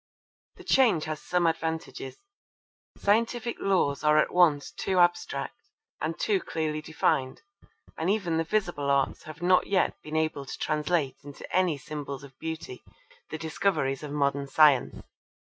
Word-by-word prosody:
The - - -13
change 230 -12 +3
has 155 -1 -4
some 180 -1 0
advantages. 160 - -2 0.8
Scientific 230 +3 +1
laws 155 -8 +1
are 150 0 +4
at 155 - +2
once 160 -5 +3
too 190 - -2
abstract 175 -5 +1 0.4
and 160 +2 -2
too 205 -3 +1
clearly 155 -3 -3
defined, 135 -4 -1 0.6
and 165 +3 0
even 195 -6 0
the 165 - +1
visible 170 -6 -1
arts 140 -1 +1
have 155 +2 -9
not 180 +1 +4
yet 195 -2 +1
been 155 +1 -7
able 155 -3 -1
to - - -6
translate 150 -2 0
into 145 0 -10
any 180 -5 +2
symbols 140 -1 -6
of 135 -1 -13
beauty 160 -6 -6 0.5
the 160 - -4
discoveries 160 -4 -1
of 150 -2 -7
modern 140 -1 0
science. 145 -2 +4
160 Hz, 145 wpm, -27 LUFS, 145-180 Hz, 0.8 s, are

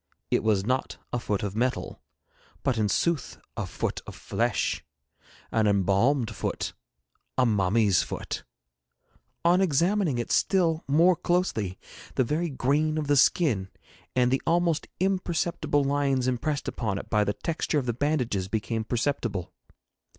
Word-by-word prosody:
It - - +3
was 105 -3 +2
not 130 +3 -1 0.2
a 120 - +1
foot 105 -3 -2
of 100 -1 -3
metal, 125 +3 -1 0.6
but 135 - +1
in 105 -1 +2
sooth 170 - 0 0.2
a - - -3
foot - - -3
of - - -8
flesh, - - -1 0.7
an 110 -1 +2
embalmed 105 +5 +2
foot, - - -3 0.6
a 130 - +4
mummy's 105 -2 +3
foot. - - -5 1.0
On 175 +2 +5
examining 175 -2 +2
it 120 - -3
still 170 -4 +2
more 170 +6 +5
closely 170 - 0 0.4
the 130 - +3
very 160 +7 -1
grain 150 +3 +1
of 155 - -1
the 145 0 +3
skin, 125 - +3 0.5
and 125 -1 +3
the 135 - +2
almost 170 -2 +2
imperceptible 170 -5 0
lines 140 -2 +1
impressed 140 +4 -1
upon 105 -5 -2
it - - -6
by 105 -1 +4
the 105 0 0
texture 165 +2 -2
of 140 - 0
the 120 - 0
bandages, 125 -8 0
became 110 +2 -2
perceptible. 115 -6 -2
130 Hz, 145 wpm, -27 LUFS, 110-155 Hz, 1.0 s, On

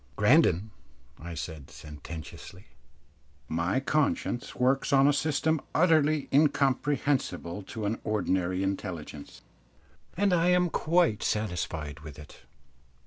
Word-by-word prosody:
"Grandon," 100 +6 +3 0.5
I 85 +1 -7
said, 80 -3 -7
sententiously, 80 +4 -10 0.8
"my 85 +8 0
conscience 140 -3 -1
works 130 +2 +1
on 135 0 +5
a 145 - +4
system 155 +1 0
utterly 155 -3 +3
incomprehensible 135 - +1
to 105 +2 -6
an 105 +3 -2
ordinary 95 -3 -1
intelligence, 90 -7 -5 0.7
and 200 0 +2
I 170 0 +3
am 180 -1 +3
quite 165 -9 +2
satisfied 85 -8 -3
with 75 -2 -11
it. 75 -1 -13
110 Hz, 105 wpm, -28 LUFS, -, 0.8 s, on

